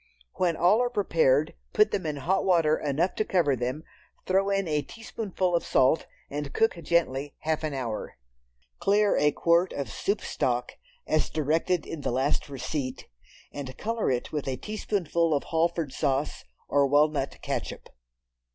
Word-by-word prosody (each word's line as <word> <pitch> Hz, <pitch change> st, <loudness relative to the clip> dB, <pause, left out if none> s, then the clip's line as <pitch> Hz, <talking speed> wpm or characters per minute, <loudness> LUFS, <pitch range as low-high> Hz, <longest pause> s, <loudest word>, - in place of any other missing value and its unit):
When 170 Hz, -3 st, +1 dB
all 190 Hz, +7 st, +4 dB
are 245 Hz, -, +1 dB
prepared, 160 Hz, -, +2 dB, 0.2 s
put 210 Hz, 0 st, +4 dB
them 185 Hz, -5 st, -2 dB
in 150 Hz, -, -2 dB
hot 180 Hz, +8 st, 0 dB
water 165 Hz, -5 st, +3 dB
enough 155 Hz, +6 st, 0 dB
to -, -, +2 dB
cover 170 Hz, -9 st, +2 dB
them, 125 Hz, +5 st, -3 dB, 0.4 s
throw 195 Hz, +1 st, +2 dB
in 195 Hz, -2 st, 0 dB
a 150 Hz, -2 st, +1 dB
teaspoonful 190 Hz, -1 st, -3 dB
of 170 Hz, -, +1 dB
salt 130 Hz, +5 st, +3 dB, 0.2 s
and 145 Hz, -1 st, -5 dB
cook 225 Hz, -, +3 dB
gently 145 Hz, -4 st, 0 dB
half 160 Hz, 0 st, -1 dB
an 155 Hz, -3 st, -2 dB
hour. 120 Hz, -5 st, -4 dB, 0.6 s
Clear 205 Hz, +1 st, +3 dB
a 150 Hz, 0 st, +3 dB
quart 170 Hz, +4 st, +2 dB
of 140 Hz, -, -4 dB
soup 200 Hz, +1 st, -1 dB
stock 125 Hz, -1 st, -1 dB, 0.3 s
as 155 Hz, -, +1 dB
directed 160 Hz, +3 st, 0 dB
in 165 Hz, -, -6 dB
the -, -, -1 dB
last 135 Hz, +4 st, 0 dB
receipt, 130 Hz, -1 st, -4 dB, 0.5 s
and 130 Hz, -2 st, -7 dB
color 230 Hz, +1 st, -1 dB
it 125 Hz, -2 st, -1 dB
with 150 Hz, -3 st, -3 dB
a 130 Hz, -1 st, -1 dB
teaspoonful 170 Hz, -6 st, 0 dB
of 140 Hz, -, -1 dB
Halford 165 Hz, -3 st, 0 dB
sauce, 140 Hz, 0 st, -1 dB, 0.2 s
or 140 Hz, -1 st, +3 dB
walnut 145 Hz, 0 st, +2 dB
catsup. -, -, -4 dB
155 Hz, 160 wpm, -27 LUFS, 140-185 Hz, 0.6 s, all